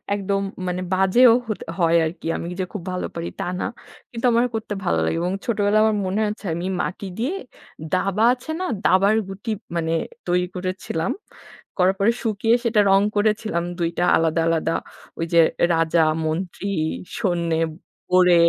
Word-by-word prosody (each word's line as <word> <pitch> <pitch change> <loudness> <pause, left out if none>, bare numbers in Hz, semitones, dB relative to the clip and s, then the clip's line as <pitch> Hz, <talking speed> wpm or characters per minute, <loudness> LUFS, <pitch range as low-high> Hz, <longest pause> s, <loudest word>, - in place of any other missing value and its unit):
একদম 200 0 -1 0.3
মানে 180 +1 -2
বাজেও 210 +6 +6
হত 215 - -3 0.2
হয় 170 0 +4
আর 160 - -1
কি। - - -6
আমি 170 - -5
যে 185 - 0
খুব 205 - -4
ভালো 180 - -2
পারি 170 0 -3
তা - - -2
না। - - -1 0.5
কিন্তু 235 +1 -4
আমার 235 +2 +4
করতে 220 -1 -3
ভালো 175 - +1
লাগে 165 - 0
এবং 180 +2 -1
ছোটবেলায় 215 -2 +2
আমার 215 -1 +2
মনে 200 +4 0
আছে 210 0 -7
আমি 175 +2 -4 0.2
মাটি 195 +2 -4
দিয়ে 260 +11 -1 0.6
দাবা 195 +3 +1
আছে 260 +5 -7
না, 370 - -1 0.2
দাবার 195 +3 +4
গুটি 195 +4 -7 0.3
মানে 165 -1 -1 0.4
তৈরি 180 0 +2
করেছিলাম। 185 -3 -2 0.7
করার 185 +1 +3
পরে 210 +4 +4
শুকিয়ে 225 +1 +2
সেটা 220 -2 +3
রং 195 0 +6
করেছিলাম 210 -4 +1 0.2
২টা 170 +1 0
আলাদা 165 0 +1
আলাদা। 165 0 +1 0.5
ঐ - - -15
যে 170 - +6 0.3
রাজা, 165 +1 +2 0.3
মন্ত্রী, 175 +4 -3 0.5
সৈন্যে, 170 -4 0 0.5
গোরে 180 -1 +6
190 Hz, 160 wpm, -22 LUFS, 170-215 Hz, 0.7 s, বাজেও